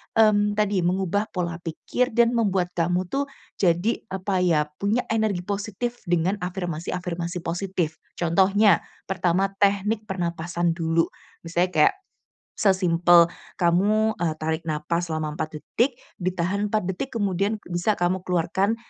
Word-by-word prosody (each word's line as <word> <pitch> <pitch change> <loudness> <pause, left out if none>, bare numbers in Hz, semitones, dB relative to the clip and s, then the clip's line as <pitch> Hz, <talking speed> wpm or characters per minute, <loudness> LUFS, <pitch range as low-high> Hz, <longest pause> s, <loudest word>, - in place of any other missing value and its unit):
mmm, 210 -2 +4
tadi 205 -2 +1
mengubah 190 +4 0
pola 170 -2 -2
pikir 175 +9 -2
dan 235 0 +5
membuat 195 -6 +1
kamu 175 +2 0
tuh 280 +1 0 0.3
jadi 180 +5 +2
apa 190 -1 -2
ya, 165 -4 +3
punya 210 +5 +1
energi 215 -5 0
positif 205 +5 -3
dengan 175 +4 +1
afirmasi-afirmasi 175 -1 -4
positif. 175 -2 -2 0.2
Contohnya, 190 +3 +4 0.2
pertama 185 +1 0
teknik 205 +2 +1
pernapasan 170 -1 -1
dulu. 165 0 +1 0.4
Misalnya 175 +2 0
kayak 150 - +5 0.6
sesimpel 175 -4 +4 0.2
kamu, 205 +6 +3
eee, 165 -3 0
tarik 160 +1 -2
napas 170 +3 -1
selama 155 -1 -2
4 155 0 -4
detik, 240 - 0 0.2
ditahan 185 +3 -1
4 215 -1 0
detik 190 +8 -4
kemudian 200 0 0
bisa 175 +4 0
kamu 180 +1 0
keluarkan 190 +5 +1
185 Hz, 125 wpm, -24 LUFS, 170-205 Hz, 0.6 s, dan